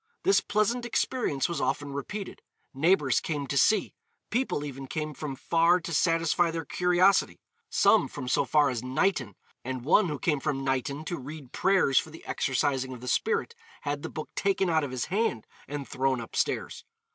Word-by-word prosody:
This 390 Hz, +2 st, +4 dB
pleasant 220 Hz, +4 st, 0 dB
experience 240 Hz, -, 0 dB
was 170 Hz, -4 st, -3 dB
often 145 Hz, -1 st, -1 dB
repeated. 195 Hz, +8 st, -6 dB, 0.3 s
Neighbours 145 Hz, -2 st, +3 dB
came 145 Hz, -3 st, -3 dB
to 140 Hz, -, -4 dB
see. 215 Hz, +10 st, +3 dB, 0.4 s
People 230 Hz, -, 0 dB
even 135 Hz, -1 st, -7 dB
came 155 Hz, +1 st, -3 dB
from 145 Hz, -1 st, -5 dB
far 170 Hz, +6 st, +3 dB
to 170 Hz, 0 st, -6 dB
satisfy 165 Hz, +1 st, +2 dB
their 165 Hz, 0 st, -4 dB
curiosity 180 Hz, -, +2 dB, 0.3 s
some -, -, +4 dB
from 130 Hz, -, -7 dB
so -, -, +2 dB
far 150 Hz, -3 st, +3 dB
as 120 Hz, -3 st, -3 dB
Knighton; 130 Hz, -, 0 dB, 0.3 s
and 130 Hz, -1 st, -5 dB
one 185 Hz, +6 st, +4 dB
who 150 Hz, -, -3 dB
came 150 Hz, +1 st, 0 dB
from 135 Hz, -1 st, -2 dB
Knighton 135 Hz, +3 st, -2 dB
to 175 Hz, -, -4 dB
read 140 Hz, 0 st, -9 dB
prayers 190 Hz, -9 st, +3 dB
for -, -, -6 dB
the 160 Hz, -, -13 dB
exorcising 130 Hz, 0 st, 0 dB
of 125 Hz, -, -10 dB
the 125 Hz, -, -8 dB
spirit, 455 Hz, -, 0 dB, 0.3 s
had 145 Hz, 0 st, -3 dB
the -, -, -5 dB
book 155 Hz, -, -7 dB
taken 195 Hz, -2 st, +1 dB
out 160 Hz, -1 st, +2 dB
of 145 Hz, -, -3 dB
his 125 Hz, -2 st, -3 dB
hand 195 Hz, -, -1 dB, 0.2 s
and 145 Hz, -1 st, -5 dB
thrown 130 Hz, -1 st, 0 dB
upstairs. 115 Hz, -, -2 dB
150 Hz, 180 wpm, -28 LUFS, 135-180 Hz, 0.4 s, This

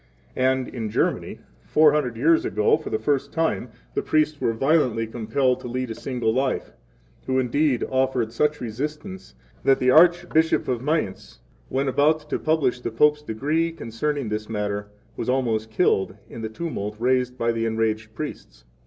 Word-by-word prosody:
12 130 Hz, -, +1 dB
And 130 Hz, -1 st, +1 dB
in 115 Hz, -3 st, -4 dB
Germany, -, -, -1 dB, 0.2 s
four 155 Hz, -1 st, +5 dB
hundred 125 Hz, -6 st, -1 dB
years 160 Hz, +6 st, +4 dB
ago 105 Hz, +2 st, +2 dB
for 155 Hz, -, -6 dB
the -, -, 0 dB
first 140 Hz, +4 st, -1 dB
time, 160 Hz, -12 st, -1 dB, 0.2 s
the -, -, 0 dB
priests 155 Hz, -1 st, +1 dB
were -, -, +2 dB
violently 125 Hz, -2 st, +2 dB
compelled 120 Hz, +3 st, 0 dB
to -, -, -7 dB
lead 125 Hz, 0 st, -3 dB
a -, -, -2 dB
single 120 Hz, -2 st, -2 dB
life, 130 Hz, +1 st, -1 dB, 0.6 s
who 130 Hz, 0 st, +1 dB
indeed 130 Hz, +1 st, +1 dB
offered 130 Hz, -3 st, 0 dB
such 150 Hz, +4 st, +1 dB
resistance 150 Hz, -, -6 dB, 0.3 s
that 135 Hz, -, +4 dB
the 130 Hz, 0 st, +3 dB
Archbishop 170 Hz, 0 st, +4 dB
of 125 Hz, -2 st, -1 dB
Mayence, 150 Hz, -, -2 dB, 0.3 s
when 135 Hz, +1 st, 0 dB
about 150 Hz, +3 st, +2 dB
to -, -, 0 dB
publish 150 Hz, -6 st, +1 dB
the 120 Hz, -, -2 dB
Pope's 150 Hz, +6 st, +3 dB
decree 150 Hz, +7 st, -1 dB
concerning 140 Hz, -2 st, -3 dB
this 105 Hz, 0 st, -4 dB
matter, 105 Hz, -1 st, -2 dB, 0.3 s
was -, -, -4 dB
almost 115 Hz, -4 st, 0 dB
killed 105 Hz, -, +1 dB
in 115 Hz, -, -9 dB
the 110 Hz, -, -3 dB
tumult 110 Hz, -6 st, -4 dB
raised 125 Hz, +1 st, +1 dB
by 115 Hz, -1 st, +1 dB
the 115 Hz, 0 st, -1 dB
enraged 110 Hz, -1 st, -1 dB
priests. -, -, -7 dB
130 Hz, 170 wpm, -24 LUFS, 115-150 Hz, 0.6 s, four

